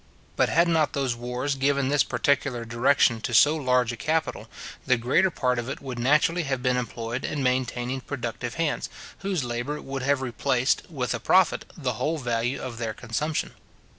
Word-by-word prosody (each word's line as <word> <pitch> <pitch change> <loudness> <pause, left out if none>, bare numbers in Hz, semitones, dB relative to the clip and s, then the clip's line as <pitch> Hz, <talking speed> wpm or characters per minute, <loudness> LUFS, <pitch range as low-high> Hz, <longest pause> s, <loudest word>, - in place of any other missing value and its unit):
But - - +2
had 170 +1 +4
not 160 -4 +2
those 135 -3 0
wars 125 +4 -2
given 135 0 +1
this 145 -2 +4
particular 130 -4 0
direction 120 0 +3
to 120 - -2
so 150 +6 +6
large 125 -5 +2
a - - -5
capital, 155 +8 -1 0.4
the 125 -2 +4
greater 130 +11 +3
part 125 -7 0
of 120 +2 -4
it 140 - -4
would 130 -3 -6
naturally 150 +7 +3
have 135 -5 -2
been 125 -1 +2
employed 120 0 -3
in 145 -2 -2
maintaining 125 0 -1
productive 120 -3 -5
hands, 165 -2 -1 0.3
whose 190 -6 -1
labour 120 +5 -3
would 135 -1 -5
have 135 0 +1
replaced, 125 +3 0
with 130 -7 -2
a 115 - -3
profit, 185 - +3
the 130 -6 -1
whole 160 +5 0
value 120 -1 -1
of 120 -3 -6
their 110 -2 -3
consumption. 145 +7 -2
130 Hz, 180 wpm, -26 LUFS, 120-145 Hz, 0.4 s, so